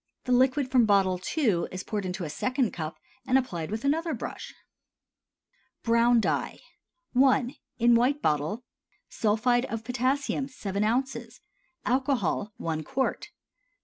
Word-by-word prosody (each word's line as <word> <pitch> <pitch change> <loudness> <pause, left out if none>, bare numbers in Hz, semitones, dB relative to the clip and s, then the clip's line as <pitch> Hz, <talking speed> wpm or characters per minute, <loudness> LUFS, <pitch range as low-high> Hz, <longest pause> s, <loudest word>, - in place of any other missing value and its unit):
The 250 - -3
liquid 255 +2 +3
from 245 -4 +4
bottle 190 -3 +3 0.2
II. 215 - +2
is 185 0 -5
poured 205 -3 -3
into 180 0 -4
a 155 - -4
second 255 - 0
cup 160 -1 -5 0.3
and 260 - +4
applied 185 -12 -2
with 220 +5 -4
another 320 +3 +1
brush. - - -7 1.3
BROWN 235 +1 +4
DYE. - - -1 0.6
I. 260 -1 +3 0.2
(In 240 0 +4
White 250 +5 +3
Bottle.) 155 - -1 0.5
Sulphide 240 +3 +1
of 225 -2 -5
potassium 265 +3 -1
7 205 -6 -3
oz. 255 +5 -2 0.5
Alcohol 250 - 0
1 160 -1 -3
qt. 265 - -2
240 Hz, 130 wpm, -27 LUFS, 200-260 Hz, 1.3 s, from